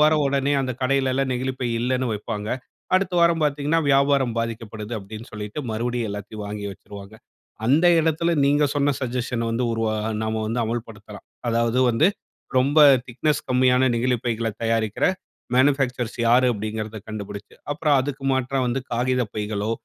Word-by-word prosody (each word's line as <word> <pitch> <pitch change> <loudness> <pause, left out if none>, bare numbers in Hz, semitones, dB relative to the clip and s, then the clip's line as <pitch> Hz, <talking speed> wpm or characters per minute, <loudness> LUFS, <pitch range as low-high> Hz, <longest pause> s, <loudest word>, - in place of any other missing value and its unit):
வாரம் 150 0 +4
உடனே 140 +1 +1
அந்த 130 -1 -2
கடையில 135 0 +2
எல்லாம் 135 0 0
நெகிழிப் 130 +1 -3
பை 125 - 0
இல்லனு 130 +1 0
வைப்பாங்க. 105 0 -4 0.5
அடுத்த 185 -1 -1
வாரம் 170 -1 +3
பாத்தீங்கன்னா 150 +2 +1
வியாபாரம் 135 -3 +3
பாதிக்கப்படுது 115 -1 -4
அப்படினு 110 +3 -9
சொல்லிட்டு, 105 +6 -5
மறுபடியும் 120 0 -2
எல்லாத்தையும் 105 +1 -6
வாங்கி 105 0 -5
வச்சுடுவாங்க. 100 +1 -12 0.5
அந்த 150 +8 +4
இடத்தில 160 +1 +1
நீங்க 145 +1 +3
சொன்ன 145 0 +2
சஜஷன்‌ 125 -2 -2
வந்து 115 +2 0
உருவா 115 -1 0 0.3
நாம 110 0 -1
வந்து 115 +2 -1
அமல் 115 +1 -3
படுத்தலாம். 105 -1 -12 0.2
அதாவது 115 +1 +1
வந்து 140 +10 +4 0.5
ரொம்ப 140 +4 +2 0.3
திக்னெஸ் 145 +5 -1
கம்மியான 125 0 +4
நெகிழிப் 125 0 0
பைகள்ல 115 -1 -1
தயாரிக்கிற 115 -2 +1 0.5
மேனுஃபேக்சர்ஸ் 130 -3 +1
யாரு 125 +2 +5
அப்படின்கிறத 110 0 -4
கண்டுபுடிச்சு. 100 -1 -7 0.2
அப்புறம் 150 -1 +2
அதுக்கு 135 0 -5
மாற்ற 130 +1 0
வந்து 125 +2 -1
காகிதப் 125 -2 0
பைகளோ, 105 0 -2
125 Hz, 150 wpm, -23 LUFS, 110-135 Hz, 0.5 s, யாரு